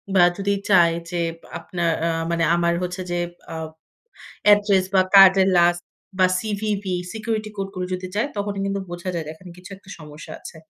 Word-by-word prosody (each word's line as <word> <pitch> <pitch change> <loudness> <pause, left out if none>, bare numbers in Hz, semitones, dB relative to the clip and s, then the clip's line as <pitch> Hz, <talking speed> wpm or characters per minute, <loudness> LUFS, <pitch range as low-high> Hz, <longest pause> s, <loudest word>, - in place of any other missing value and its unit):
বা 180 - +6
যদি 200 0 -1 0.2
চায় 170 -3 +5 0.2
যে, 175 - -3 0.4
আপনার 170 -2 -2 0.2
আ - - +1 0.2
মানে 170 0 0
আমার 170 0 +1
হচ্ছে 180 +1 -4
যে, 175 - -1 0.4
আ - - -6 0.9
অ্যাড্রেস। 205 -2 +5
বা 190 - +5
কার্ডের 195 0 +7
লাস্ট 175 0 +3 0.4
বা 185 - +6
সিভিভি, 205 -3 -2 0.2
সিকিউরিটি 220 -1 -3
কোড 195 0 -3
গুলো 180 0 -3
যদি 185 0 -4
যায় 230 +7 +1
তখনই 200 -1 -3
কিন্তু 200 0 -2
বোঝা 175 +1 -5
যায় 165 -2 -3
যে, - - -7
এখানে 180 +3 -14
কিছু 185 +2 -13
একটা 195 0 -19
সমস্যা 150 +1 -11
আছে। - - -11
185 Hz, 180 wpm, -22 LUFS, 175-200 Hz, 0.9 s, কার্ডের